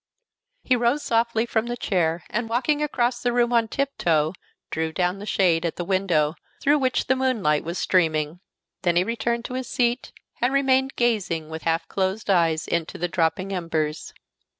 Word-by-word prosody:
He 255 - +3
rose 245 +4 +1
softly 230 0 +1
from 230 -1 -1
the 240 0 -3
chair, 170 -5 0
and 225 +1 -2
walking 280 +6 +1
across 240 -4 0
the 245 - +1
room 240 0 +2
on 230 -1 +3
tiptoe, 170 - 0 0.4
drew 160 0 -1
down 180 +3 -1
the 205 - -8
shade 175 -5 +2
at 170 - -2
the 175 - -4
window 170 -5 +1 0.3
through 290 +2 +3
which 260 -2 +1
the 260 - +2
moonlight 225 - +1
was 170 +3 -4
streaming. 160 -3 +1 0.4
Then 175 -2 +1
he 175 - +4
returned 235 +2 -2
to - - -5
his 255 -1 -4
seat, 240 0 0 0.3
and 250 +3 +2
remained 265 -1 +2
gazing 190 -10 0
with 160 0 -5
half 165 0 0
closed 195 +2 -1
eyes 165 -3 +2
into 170 -1 -2
the 175 - -1
dropping 180 +3 0
embers. 160 -4 -2
195 Hz, 175 wpm, -24 LUFS, 165-240 Hz, 0.4 s, he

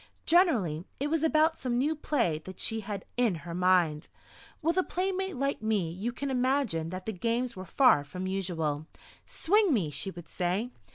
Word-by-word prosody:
Generally 225 - +3
it 290 +2 -1
was 325 -2 +2
about 320 0 +3
some 245 -2 -1
new 290 +5 +2
play 235 - 0
that 185 -1 -9
she 225 - -1
had 200 -2 -5
in 235 -7 +2
her 170 - -5
mind. 180 -4 +2 0.5
With 330 +2 +1
a - - +6
playmate 380 +1 -2
like 275 -1 -1
me 210 -7 0
you 200 +8 -3
can 275 +3 -4
imagine 250 - +1
that 185 +1 -6
the 220 - -3
games 235 +6 -1
were 185 0 -7
far 250 - +4
from 180 +6 -6
usual! 165 -6 -2 0.4
"Swing 405 +2 +3
me!" 190 - +1
she 170 +7 -3
would 175 -2 -10
say. 190 +7 -1
220 Hz, 180 wpm, -29 LUFS, 180-280 Hz, 0.5 s, a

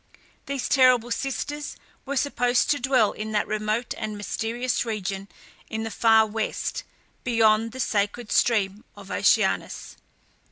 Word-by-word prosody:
These 280 -2 -2
terrible 255 -3 +4
sisters 290 +3 -3 0.3
were 280 0 -2
supposed 245 -3 +2
to 290 - +1
dwell 250 -4 +3
in 215 0 -6
that 210 - +1
remote 215 +3 -2
and 215 -1 -5
mysterious 230 +4 -2
region 200 -4 -4 0.4
in 220 0 -3
the 225 - -4
far 220 -1 +5
West, 220 0 -3 0.4
beyond 225 -2 +3
the 260 - -9
sacred 210 0 -1
stream 210 -3 +2
of 200 -1 -11
Oceanus. - - +1
225 Hz, 130 wpm, -25 LUFS, 215-250 Hz, 0.4 s, far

